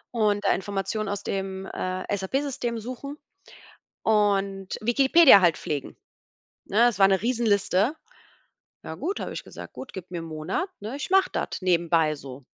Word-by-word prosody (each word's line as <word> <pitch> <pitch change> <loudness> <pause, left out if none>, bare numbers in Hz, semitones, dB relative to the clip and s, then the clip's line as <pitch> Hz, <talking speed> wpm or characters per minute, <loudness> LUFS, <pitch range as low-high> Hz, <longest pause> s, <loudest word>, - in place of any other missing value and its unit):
und 210 -2 +1
da - - +4
Informationen 200 +2 -3
aus 205 0 -4
dem, 195 0 -4
äh, 185 +1 -3
SAP-System 245 +2 -2
suchen 255 +5 -7 0.9
und 200 -3 +1
Wikipedia 265 +1 +7
halt 175 -3 +3
pflegen. 145 -3 -4 0.7
Ne, 205 - 0
das 235 -4 +4
war 195 - +8
eine 195 -1 +3
Riesenliste. 225 - +1 0.9
„Ja - - -7
gut“, 395 +3 -3
habe - - -5
ich - - -6
gesagt: - - -11
„Gut, 265 - -9
gib 185 -1 -9
mir 175 -2 -4
'n - - -7
Monat, 165 - -3
ne, 220 +6 -5
ich 290 - -5
mache 385 0 +4
das - - -3
nebenbei 170 -3 +2
so.“ 135 -2 -10
200 Hz, 155 wpm, -25 LUFS, 185-240 Hz, 0.9 s, war